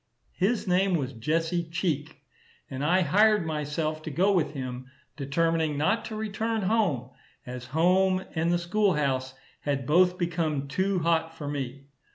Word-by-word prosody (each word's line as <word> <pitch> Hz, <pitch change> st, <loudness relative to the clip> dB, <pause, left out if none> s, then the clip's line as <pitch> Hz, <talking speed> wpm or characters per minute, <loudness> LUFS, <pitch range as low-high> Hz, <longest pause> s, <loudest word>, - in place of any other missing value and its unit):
His 210 Hz, +3 st, 0 dB
name 185 Hz, +1 st, +3 dB
was 135 Hz, -5 st, -2 dB
Jesse 165 Hz, +8 st, 0 dB
Cheek, 160 Hz, -4 st, -3 dB, 0.5 s
and 135 Hz, +1 st, -4 dB
I 180 Hz, +5 st, +3 dB
hired 205 Hz, +4 st, +4 dB
myself 155 Hz, 0 st, -2 dB
to 155 Hz, -, -6 dB
go 185 Hz, +7 st, +2 dB
with 155 Hz, -7 st, +1 dB
him, 130 Hz, -2 st, -5 dB, 0.3 s
determining 160 Hz, +2 st, 0 dB
not 220 Hz, +10 st, +1 dB
to 220 Hz, -, -6 dB
return 220 Hz, +1 st, -2 dB
home, 185 Hz, -, +1 dB, 0.3 s
as 125 Hz, 0 st, -7 dB
home 185 Hz, +5 st, +2 dB
and 165 Hz, +1 st, +1 dB
the 175 Hz, -, +3 dB
school 185 Hz, +2 st, +1 dB
house 130 Hz, -3 st, -1 dB, 0.2 s
had 140 Hz, -3 st, -2 dB
both 180 Hz, +5 st, +4 dB
become 160 Hz, -5 st, -1 dB
too 190 Hz, +7 st, 0 dB
hot 165 Hz, 0 st, +1 dB
for 145 Hz, -, -6 dB
me. 140 Hz, -2 st, -4 dB
165 Hz, 155 wpm, -27 LUFS, 145-185 Hz, 0.5 s, hired